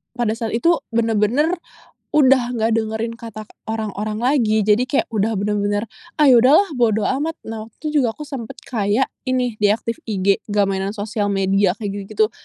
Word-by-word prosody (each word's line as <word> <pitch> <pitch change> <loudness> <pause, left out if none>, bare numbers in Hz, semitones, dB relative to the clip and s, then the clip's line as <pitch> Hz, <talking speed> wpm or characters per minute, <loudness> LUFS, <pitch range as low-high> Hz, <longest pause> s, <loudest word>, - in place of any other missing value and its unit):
pada 240 -3 0
saat 225 -1 -3
itu, 335 +9 +3 0.2
bener-bener 230 - +2 0.6
udah 260 -4 +4
nggak 225 0 +1
dengerin 220 +1 -2
kata 220 -2 -8 0.2
orang-orang 215 -1 -3
lagi. 230 -5 +2
Jadi 215 +4 +3
kayak 270 - 0
udah 220 +1 0
bener-bener, 205 +1 0 0.3
"Ah, 300 -2 +5
ya 245 - +7
udah 255 +4 +5
lah 400 - -10
bodo 220 -3 +2
amat." 305 +4 -1
Nah 220 -1 -6
waktu 225 - -25
tuh - - -4
juga 230 -3 -1
aku 300 - -7
sempet 270 -6 -7
kayak 225 -1 0 0.2
ini 250 -3 0
deactive 215 +2 +1
IG, 195 -2 +1
nggak 205 -1 +2
mainan 195 +1 -2
sosial 205 0 -2
media 195 -1 +2
kek 210 -1 -5
gitu-gitu. 205 - -1
220 Hz, 175 wpm, -20 LUFS, 205-245 Hz, 0.6 s, ya